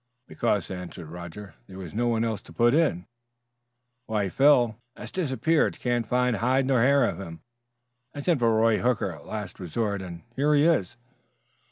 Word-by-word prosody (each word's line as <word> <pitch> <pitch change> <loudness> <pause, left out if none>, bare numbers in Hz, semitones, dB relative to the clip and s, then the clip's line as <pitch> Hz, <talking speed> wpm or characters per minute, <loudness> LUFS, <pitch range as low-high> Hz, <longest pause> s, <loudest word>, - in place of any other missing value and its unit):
"Because," 105 -6 -1
answered 90 -3 -7
Roger, 90 +2 -9
"there 95 - -11
was 90 -4 -8
no 120 +3 0
one 115 -1 +1
else 110 -3 -2
to - - -16
put 120 +1 +3
in." 145 - +1 1.0
"Why, 105 -3 -1
Phil 125 -2 +4
" 120 - -52
"Has - - -9
disappeared; 160 -1 0
can't 120 -2 -1
find 125 -1 +1
hide 130 +4 +2
nor 130 -3 +2
hair 140 +3 +4
of - - -3
him. 85 -4 -8 0.7
I 145 - -4
sent 165 -1 +1
for 115 -1 +3
Roy 110 0 +3
Hooker 125 -4 0
as - - -11
a - - -17
last 105 -5 -6
resort 100 +3 -2
and 85 -2 -8
here 150 +3 +2
he 145 +1 +4
is!" 120 - +1
115 Hz, 185 wpm, -26 LUFS, 95-130 Hz, 1.0 s, Phil